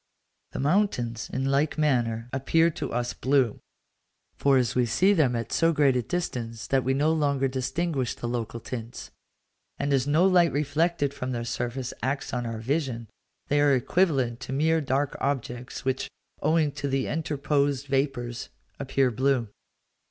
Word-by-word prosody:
The - - -4
mountains, 135 - 0
in 130 +1 -1
like 140 +3 +1
manner, 120 -6 +1
appear 165 +5 +3
to - - -5
us 120 0 -1
blue; 130 -4 +1 0.8
for, 140 -1 +3
as 120 -5 +1
we 125 -1 +2
see 185 - +3
them 145 -10 +2
at 115 -1 -3
so 165 0 +3
great 145 -4 +3
a 125 - +2
distance 115 -8 -4
that 135 -1 +1
we 130 +1 +1
no 150 +3 +2
longer 140 -3 +1
distinguish 135 +1 -2
the 120 - -5
local 115 -1 -3
tints, 115 0 -7 0.7
and 140 0 0
as 135 0 +2
no 155 +5 +4
light 180 -3 +5
reflected 145 +1 0
from 130 -2 -4
their 120 -1 -3
surface 125 +1 -3
acts 135 +2 -2
on 120 -1 -2
our 115 -1 -4
vision, 120 -2 -2 0.4
they 145 0 +2
are 145 -2 +5
equivalent 130 -4 +1
to 120 - -7
mere 160 +4 +2
dark 135 0 0
objects, 125 -2 -3
which, 130 0 -1 0.3
owing 155 -1 +2
to 140 0 -4
the 135 -1 0
interposed 145 -3 0
vapours, 135 -3 -2 0.3
appear 135 -1 +1
blue. 130 -1 +1
135 Hz, 160 wpm, -26 LUFS, 120-145 Hz, 0.8 s, light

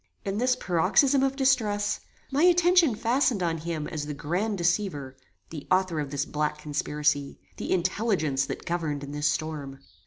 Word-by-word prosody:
In 200 +1 -2
this 250 +1 +2
paroxysm 220 - +3
of 270 0 +1
distress, 220 -7 +1 0.3
my 275 +2 +1
attention 350 -5 +5
fastened 235 -3 +1
on 165 -1 -1
him 160 -2 -4
as 150 -3 -4
the 150 - -4
grand 185 +9 -2
deceiver; 170 -7 -1 0.4
the 155 -3 -8
author 185 -3 +2
of 145 -2 -3
this 145 +1 -2
black 150 0 -2
conspiracy; 150 -1 -1 0.2
the - - -4
intelligence 175 -7 0
that - - -6
governed 160 -4 -2
in 140 - -7
this 150 +1 0
storm. 150 -3 -3
170 Hz, 160 wpm, -27 LUFS, 150-220 Hz, 0.4 s, attention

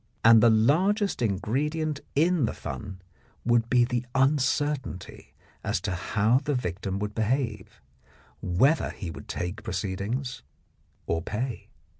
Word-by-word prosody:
And 115 -1 +8
the 120 - +7
largest 175 - +2
ingredient 140 - -1 0.2
in 165 -1 +3
the - - -3
fun 95 -4 -7 0.4
would 120 -1 +2
be 125 -1 +4
the 120 -1 -1
uncertainty 135 -5 0 0.3
as - - 0
to 100 0 -2
how 105 +6 +2
the 145 -1 0
victim 95 -3 -3
would 105 +1 -3
behave, 110 -2 -2 0.6
whether 135 - +2
he 90 -5 -6
would - - -10
take 90 +4 -4
proceedings 110 +6 -3 0.6
or 80 - -1
pay. 115 +7 -4
120 Hz, 125 wpm, -27 LUFS, 100-140 Hz, 0.6 s, And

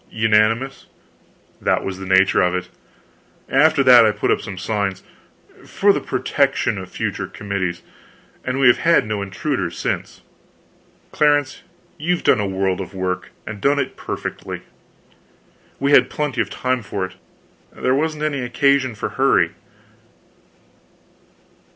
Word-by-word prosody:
"Unanimous?" 110 +4 +1 0.7
"That - - +1
was 95 -1 -5
the 95 - -7
nature 95 0 +4
of 90 0 +1
it. 90 0 -4 0.8
After 150 +1 +4
that 125 -3 +8
I 110 - +4
put 105 - -1
up - - +1
some 100 -4 -7
signs, 100 -1 -2 0.6
for - - +2
the - - -1
protection - - 0
of - - -8
future - - -3
committees, 100 -3 -4 0.6
and 130 +1 -2
we 135 - +3
have 120 - +6
had 170 -5 +3
no 105 -1 -3
intruders 100 - -3
since." - - -4 0.9
"Clarence, 145 -2 +1 0.4
you've 175 +3 -1
done 120 - +4
a 100 - -1
world 95 0 -1
of 95 - -8
work, 95 -1 -3 0.2
and 105 -2 -7
done 140 +4 +2
it 140 -2 -2
perfectly." - - -6 1.2
"We 140 +1 +1
had - - +6
plenty 145 -5 -2
of 105 - -3
time 130 +2 -1
for 100 -2 -3
it; 95 - -10 0.6
there 130 - -1
wasn't 155 +2 -1
any 145 -3 -1
occasion 130 0 +1
for - - -4
hurry." - - +2
115 Hz, 140 wpm, -20 LUFS, 95-140 Hz, 1.2 s, that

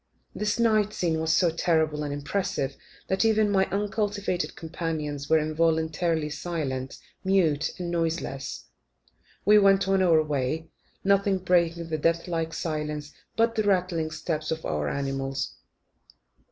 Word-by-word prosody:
This 210 0 -1
night 215 -3 +3
scene 165 -3 0
was 160 0 0
so 170 +1 +4
terrible 160 -2 +1
and 145 - -3
impressive 145 -2 -2 0.3
that 190 +3 +1
even 215 -2 +3
my 190 -1 +3
uncultivated 200 -1 -1
companions 155 -3 -4
were 160 - +6
involuntarily 160 0 +1
silent 140 -6 -3 0.3
mute, 165 -6 +2
and 175 -2 -4
noiseless, 165 -5 -2 0.8
we 210 +2 +7
went 195 -1 +4
on 195 0 +3
our 165 -4 +5
way, 150 +2 -2 0.3
nothing 200 0 +3
breaking 170 -2 +1
the 155 -1 -1
death 165 +3 +1
like 165 -2 -2
stillness 150 -3 -4 0.2
but 230 0 +3
the 220 - +1
rattling 180 -5 +1
steps 155 -1 -3
of 160 0 -3
our 75 -1 -1
animals. 135 -1 -2
165 Hz, 135 wpm, -27 LUFS, 150-190 Hz, 0.8 s, we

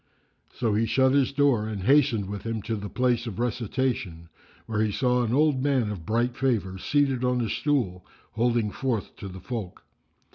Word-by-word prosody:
So 115 -4 0
he 110 +2 +1
shut 130 +4 +3
his 140 -2 +3
door 135 -6 +2
and 105 -4 -4
hastened 130 -5 +3
with 100 0 -5
him 115 -2 -4
to 115 0 -2
the 105 -1 -6
place 125 -1 0
of 105 -4 -6
recitation, 115 -7 -2 0.4
where 110 -1 -1
he 110 -1 +1
saw 125 +3 +1
an 115 -2 -1
old 145 0 +3
man 130 -6 +1
of 90 -6 -7
bright 120 +3 +1
favour 110 -9 -1
seated 135 0 +1
on 125 0 +1
a 120 - 0
stool 115 -13 0 0.3
holding 115 -1 +1
forth 120 -5 -3
to 100 - -7
the 95 0 -8
folk. 110 -5 -6
115 Hz, 185 wpm, -26 LUFS, 105-130 Hz, 0.4 s, shut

